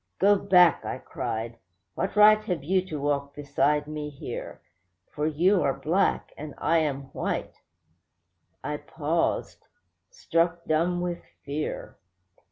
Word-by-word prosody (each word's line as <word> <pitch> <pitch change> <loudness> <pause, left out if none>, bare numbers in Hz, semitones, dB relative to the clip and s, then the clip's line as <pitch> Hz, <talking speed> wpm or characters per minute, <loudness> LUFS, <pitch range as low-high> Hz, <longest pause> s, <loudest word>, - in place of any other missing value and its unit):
'Go 205 +2 +5
back!' 180 -4 +5
I - - -4
cried. 115 +1 -5 0.4
'What - - -3
right 215 +1 +7
have 175 -8 -2
you 185 +4 +1
to 155 -4 -4
walk 140 0 -1
beside 145 0 +1
me 150 0 -5
here? 145 - -7 0.5
For 150 +1 -1
you 175 +5 +3
are 135 - +1
black, 165 +8 +1
and 150 -1 -8
I 165 0 +2
am 140 -3 -2
white.' - - -3 1.0
I 150 0 -3
paused, 160 +2 -2 0.4
struck 170 - 0
dumb 175 +3 +1
with 175 -1 -3 0.2
fear. 145 +2 -4
155 Hz, 130 wpm, -26 LUFS, 145-180 Hz, 1.0 s, right